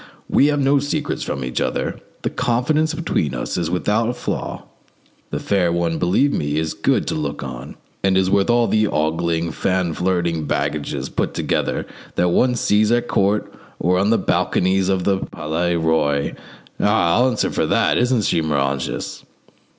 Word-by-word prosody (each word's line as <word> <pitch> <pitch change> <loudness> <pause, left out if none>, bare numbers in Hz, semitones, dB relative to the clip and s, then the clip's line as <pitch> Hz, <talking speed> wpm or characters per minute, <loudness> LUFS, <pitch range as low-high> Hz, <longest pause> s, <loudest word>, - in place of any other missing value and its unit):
"We 140 - +4
have 145 -1 +1
no 140 +1 +3
secrets 145 +1 -2
from 65 -2 -3
each 65 - -2
other; - - -2 0.2
the - - -1
confidence 150 +6 +1
between 155 - -1
us - - -3
is 85 -2 -1
without 105 +5 +1
a 125 - -2
flaw. - - -4 0.7
The - - -3
fair 95 -4 +1
one, 85 -1 0
believe 100 +11 +2
me, 75 0 -1
is 80 0 -1
good - - +1
to - - -2
look 75 -2 -3
on, 65 -2 -7 0.3
and 95 -1 +2
is 95 -1 +3
worth 100 +3 +2
all 120 0 +4
the 110 0 +2
ogling, 80 +1 0
fan 90 +1 0
flirting 85 -3 0
baggages 75 +1 -2
put - - -2
together - - -1 0.3
that 90 - +2
one 125 +8 +3
sees 105 -1 +2
at 120 0 +1
court 100 +2 +1 0.3
or 90 +2 +2
on 100 +2 +2
the 115 - +4
balconies 95 +1 +1
of 95 -2 +1
the 95 0 +1
Palais 85 +2 -2
Roy: 80 -4 +1 0.5
ah! 105 -5 +3
I'll 125 +1 +4
answer 120 - -1
for - - 0
that. - - +2
Isn't 125 -2 +2
she, 85 - +1
Moranges?" 70 -3 -2
90 Hz, 175 wpm, -20 LUFS, 80-115 Hz, 0.7 s, We